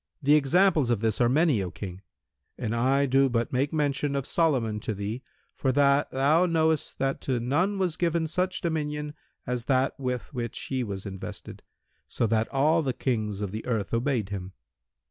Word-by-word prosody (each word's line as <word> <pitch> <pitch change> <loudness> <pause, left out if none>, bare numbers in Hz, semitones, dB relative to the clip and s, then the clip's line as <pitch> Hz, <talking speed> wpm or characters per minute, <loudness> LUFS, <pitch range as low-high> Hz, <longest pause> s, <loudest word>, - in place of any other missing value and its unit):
The 145 +2 +5
examples 155 -1 +4
of 115 -4 +1
this 110 +1 0
are 120 - +4
many, 145 - +3
O 90 - -3
King, 95 0 -8 0.6
and 115 -1 -2
I 135 +4 +2
do 135 0 +3
but 120 0 -1
make 135 +3 +1
mention 145 -2 0
of 135 -1 -1
Solomon 130 -12 +1
to 110 0 -3
thee 105 +5 -4 0.3
for 130 - 0
that 140 +1 +3
thou 150 +7 +3
knowest 160 -2 +1
that 135 0 -1
to 130 -3 -1
none 165 - 0
was 180 -4 -1
given 170 -1 +1
such 185 +3 -1
dominion 150 -2 -2 0.3
as 125 -1 -3
that 130 0 +2
with 125 +1 -3
which 120 -3 -4
he 130 -2 -2
was 100 -3 -5
invested, 95 -2 -7 0.5
so - - -1
that 110 0 +1
all 155 +4 +3
the 135 -4 -1
Kings 110 -6 -2
of 100 -3 -3
the 110 +2 -5
earth 110 -5 -2
obeyed 115 -3 0
him. 95 -2 -6
135 Hz, 185 wpm, -27 LUFS, 115-150 Hz, 0.6 s, The